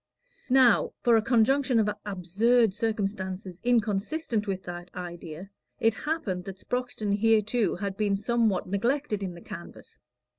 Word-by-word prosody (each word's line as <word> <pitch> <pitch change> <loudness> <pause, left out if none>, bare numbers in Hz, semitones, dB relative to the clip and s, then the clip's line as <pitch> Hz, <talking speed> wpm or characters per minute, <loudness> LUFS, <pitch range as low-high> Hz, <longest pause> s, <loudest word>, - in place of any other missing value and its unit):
Now, 255 -2 +5
for 240 -1 +5
a 225 - +4
conjunction 250 +3 +3
of 220 -2 +3 0.2
absurd 205 +4 +2
circumstances 195 -4 -3
inconsistent 225 +1 0
with 190 -1 -3
that 175 0 -7
idea, 175 0 -7 0.3
it 225 -1 +3
happened 220 - -3
that 195 -1 -7
Sproxton 245 -2 -3
hereto 225 +1 +2
had 195 +1 -4
been 205 -2 +1
somewhat 220 -2 +1
neglected 215 +3 -1
in 185 -3 -4
the 170 - -11
canvass. 180 -4 -10
210 Hz, 135 wpm, -27 LUFS, 190-235 Hz, 0.3 s, Now